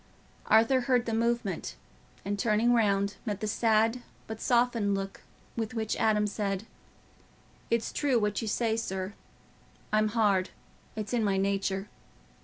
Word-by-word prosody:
Arthur 230 +4 +5
heard 245 -1 +2
the 225 - -2
movement, 225 - -1 0.5
and 200 0 -2
turning 225 +3 +3
round, 200 -3 +2
met 210 -4 -3
the - - -3
sad 225 +2 +2 0.2
but 220 0 -7
softened 235 -4 +2
look 195 0 -5 0.3
with 225 +1 -3
which 220 -1 -1
Adam 210 -1 +2
said, 200 -1 -2 1.0
"It's 230 -1 0
true 280 -4 +2
what 210 -2 0
you 225 - -4
say, 220 +1 +1
sir. 190 -3 -3 0.8
I'm 215 0 +4
hard—it's 210 0 -2
in 235 -2 +2
my 200 -2 +1
nature. 195 0 0
215 Hz, 135 wpm, -29 LUFS, 200-230 Hz, 1.0 s, Arthur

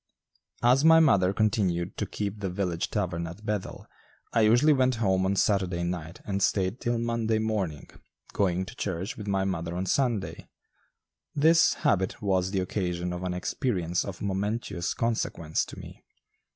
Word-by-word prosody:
As 125 +4 +5
my 160 0 +7
mother 100 - +4
continued 95 -4 0
to - - -2
keep 105 0 -4
the 100 -2 -2
village 90 -2 -2
tavern 85 -5 -2
at 85 +6 -10
Bethel, 105 -3 -4 0.5
I 115 - +3
usually 120 +8 +5
went 130 -2 +2
home 95 -4 +1
on 100 - +1
Saturday 95 -4 +1
night 85 -1 -5
and 100 -1 -2
stayed 95 +4 +1
till 120 0 0
Monday 115 -1 0
morning, 105 -9 -2 0.5
going 95 -2 +1
to 110 - -10
church 95 -1 -3
with 105 -2 -8
my 95 -1 +1
mother 85 -3 -3
on 95 - -2
Sunday. 115 -1 -1 0.9
This 160 +3 +5
habit 95 -1 +1
was 95 -2 +1
the 95 -1 -1
occasion 90 -2 -2
of 90 - -5
an 90 -1 -2
experience 90 - -1
of 100 -1 -7
momentous 100 -2 -2
consequence 110 -8 -1
to - - -11
me. - - -11
95 Hz, 160 wpm, -27 LUFS, 90-110 Hz, 0.9 s, my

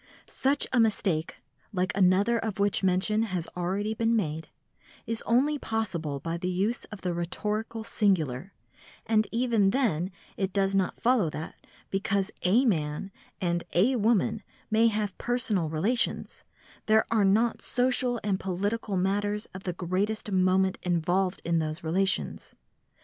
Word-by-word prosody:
Such 280 +2 +1
a 250 - +4
mistake, 190 -7 0 0.3
like 185 -1 -1
another 200 +5 +3
of 220 -3 -3
which 200 0 +1
mention 195 +3 +2
has 185 -6 -2
already 195 +5 -1
been 230 +1 +1
made, 160 -6 -2 0.6
is 230 -1 -3
only 280 +6 +3
possible 170 - -2
by 165 +4 -3
the 180 +2 -3
use 195 +6 -1
of 215 -3 -10
the 180 -1 -1
rhetorical 210 +6 -3
singular, 185 - 0 0.5
and 215 -1 +2
even 230 -4 +2
then 195 - +1 0.3
it 190 -1 -1
does 195 -1 +1
not 195 -2 0
follow 235 -8 +3
that, 155 +1 -7 0.3
because 195 0 0
a 220 +9 +3
man 155 -3 -1 0.3
and 175 -1 0
a 220 +10 +3
woman 220 -1 +2 0.3
may 225 +1 +5
have 210 -3 -1
personal 220 -9 0
relations, 195 +11 -1 0.4
there 220 0 +4
are 215 -3 +3
not 220 +4 +2
social 250 -1 +1
and 200 -2 0
political 200 +2 -2
matters 205 +3 0
of 190 0 -9
the 180 - -1
greatest 195 +5 -2
moment 185 0 +2
involved 180 +2 0
in 170 0 +2
those 155 +3 -3
relations. 185 +4 -1
195 Hz, 145 wpm, -28 LUFS, 180-220 Hz, 0.6 s, may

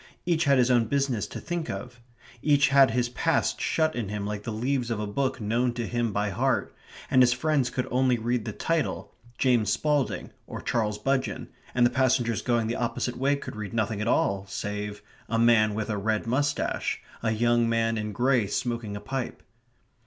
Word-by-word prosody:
Each 170 -2 +1
had 140 -1 +4
his 125 0 +3
own 120 -2 +4
business 135 -4 0
to - - -7
think 170 -2 -4
of. 125 -1 -6 0.4
Each 145 -1 +4
had 140 -1 +6
his 120 +1 +1
past 120 - 0
shut 155 -1 +1
in 115 -5 -3
him 105 -1 -3
like 105 0 -3
the 115 - -5
leaves 125 +3 -1
of 115 -2 -2
a 105 - -2
book 130 +6 -1
known 120 +3 0
to 120 - -2
him 120 -1 -1
by 105 0 -1
heart; 130 +7 0 0.4
and 130 - +6
his 125 -1 +5
friends 140 -1 +1
could 125 0 -3
only 125 -1 +3
read 120 0 -1
the - - -3
title, 165 -2 -2 0.2
James 120 -6 +2
Spalding, 150 -3 0 0.2
or - - -6
Charles 105 -3 -1
Budgeon, 130 +4 -1 0.3
and 120 -1 +5
the 120 - +3
passengers 125 -3 +1
going 120 -2 +1
the 115 +2 -1
opposite 120 +1 -2
way 140 +3 +2
could 140 - -7
read 105 0 -6
nothing 110 -1 0
at 105 - -2
all 100 -4 +1
save 105 +1 -5 0.3
"a 115 - 0
man 115 -2 +4
with 110 -1 -2
a 105 - -1
red 110 +1 0
moustache," 140 +5 -1 0.2
"a 115 - 0
young 120 +1 +2
man 115 0 +1
in 105 -1 -3
grey 125 -1 +2
smoking 115 0 -2
a - - -4
pipe." 130 +4 -4
120 Hz, 195 wpm, -27 LUFS, 110-130 Hz, 0.4 s, had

